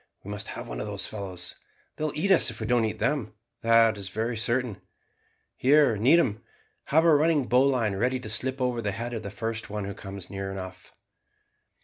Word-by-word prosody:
We 100 - -7
must 105 0 -6
have - - -6
one - - -6
of - - -4
those - - -2
fellows. 95 -4 -6 0.4
They - - -5
will 155 - -2
eat 195 +6 +1
us 190 - +7
if - - -8
we - - -3
don't 120 -2 +2
eat 110 - -3
them, 135 -6 -1 0.3
that 115 -2 +4
is 95 -1 -4
very 115 +4 -2
certain. 120 0 -1 0.7
Here, 140 -3 +4
Needham, 120 0 +3 0.4
have 160 +3 +3
a 165 -2 +6
running 150 -2 +3
bowline 125 -4 +2
ready 125 +5 0
to 125 - -7
slip 130 +4 -1
over 125 -2 0
the 100 -2 -2
head 120 +3 -4
of 115 - -3
the 100 - -6
first 115 +1 -4
who 100 -1 -4
comes 95 -1 -8
near 95 0 -5
enough." 95 -1 -9
115 Hz, 200 wpm, -27 LUFS, 100-130 Hz, 0.7 s, us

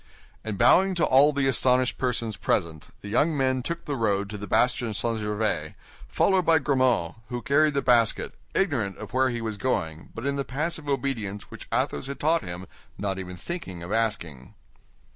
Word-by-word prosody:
And 110 -3 -4
bowing 185 - +5
to 170 - +3
all 140 +3 +5
the 140 -2 0
astonished 130 -1 +2
persons 120 -4 -1
present, 80 -6 -1
the - - -8
young 150 +9 +2
men 130 -1 +1
took 170 +6 -5
the 145 - -2
road 100 -4 0
to 105 - -5
the 105 - -6
bastion 120 0 +1
St. 115 +1 -1
Gervais, 105 -7 -2 0.3
followed 190 -1 +2
by 165 -1 +5
Grimaud, 130 - +1
who 120 -1 -4
carried 150 +1 +3
the 140 - +1
basket, 120 -3 +2 0.2
ignorant 125 - 0
of 105 -1 -9
where 130 0 +3
he 120 -1 -3
was 110 -2 -3
going 80 -10 -2
but 115 - -6
in 140 0 0
the 140 - 0
passive 150 +3 -2
obedience 120 -7 -2
which - - -10
Athos 70 - -1
had 140 - -6
taught 160 +3 +3
him 90 0 -6 0.3
not 95 -2 -2
even 90 -1 -7
thinking 95 - -6
of 85 - -7
asking. 85 - -2
120 Hz, 185 wpm, -26 LUFS, 100-140 Hz, 0.3 s, bowing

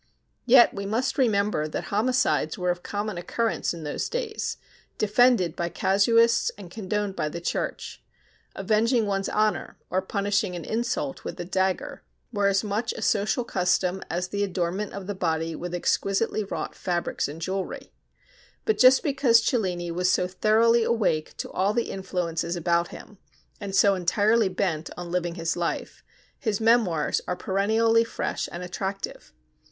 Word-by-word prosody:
Yet 245 0 +7
we 200 0 -5
must 230 +7 -1
remember 205 - +2
that 155 - -5
homicides 250 +3 +1
were 180 -2 +1
of 175 0 -4
common 205 -2 -4
occurrence 230 +5 -1
in 170 -2 -7
those 150 - -3
days, 465 -3 -3 0.4
defended 215 -5 +3
by 170 0 -2
casuists 230 +6 +3
and 190 -4 -11
condoned 205 -1 -3
by 150 - -1
the 170 - -6
Church. 170 - -4 0.5
Avenging 225 +2 +2
one's 195 -1 -1
honor, 215 0 0
or 185 - +1
punishing 200 -1 -1
an 170 - -6
insult 240 +4 -2
with - - -6
the 175 - -5
dagger, 190 +1 -1 0.3
were 205 -2 +2
as 195 +1 +2
much 215 +3 -2
a - - -8
social 210 +3 +1
custom 180 -2 0
as 180 +2 -2
the 205 +1 -1
adornment 185 +1 -2
of 200 -1 -6
the 205 - -3
body 165 -3 -1
with 175 +1 -5
exquisitely 195 +4 0
wrought - - -4
fabrics 175 -2 -2
and 150 +3 -8
jewelry. 190 +3 -4 0.7
But 440 - +1
just 255 +1 +7
because 270 -5 +4
Cellini 180 -8 -1
was 180 +2 +1
so 180 - +2
thoroughly 220 +5 +3
awake 210 -10 0
to - - -5
all 195 +3 +1
the 235 - 0
influences 175 -3 -2
about 170 0 +1
him, 205 -3 -12 0.4
and 200 -2 -4
so 200 0 +5
entirely 205 +4 +2
bent 175 -4 -2
on 175 -1 -6
living 175 -1 -1
his 165 -1 -1
life, 170 -1 -3 0.4
his 215 -5 -1
'Memoirs' 220 -9 +2
are 180 - -1
perennially 220 +5 +2
fresh 230 - -3
and 175 +1 -6
attractive. 190 +2 -5
195 Hz, 160 wpm, -26 LUFS, 180-220 Hz, 0.7 s, Yet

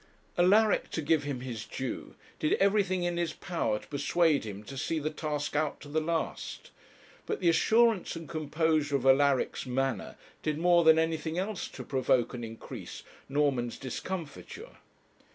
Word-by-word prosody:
Alaric, 205 +5 +4
to - - -3
give 145 0 +2
him 140 -4 -3
his 120 -4 -5
due, 130 +3 -5 0.2
did 155 - +2
everything 195 -2 +2
in 175 0 -1
his 170 -2 -1
power 140 - -1
to - - -12
persuade 150 0 +2
him 105 -1 -7
to 135 +6 -9
see 145 +4 -1
the 155 0 -2
task 150 -2 -3
out 150 0 0
to - - -11
the 155 +2 0
last. 165 0 -3 0.6
But - - -2
the 175 - +3
assurance 220 +5 +3
and 165 -1 -7
composure 155 -1 0
of 135 -2 -1
Alaric's 135 -1 +3
manner 130 -3 -1 0.3
did 150 -1 -1
more 175 +1 +4
than 160 0 +7
anything 160 0 0
else 195 +1 -2
to - - -9
provoke 130 -2 +1
and 120 -1 -5
increase 115 0 -8 0.3
Norman's 135 -4 +1
discomfiture. 185 - -6
155 Hz, 160 wpm, -30 LUFS, 135-170 Hz, 0.6 s, than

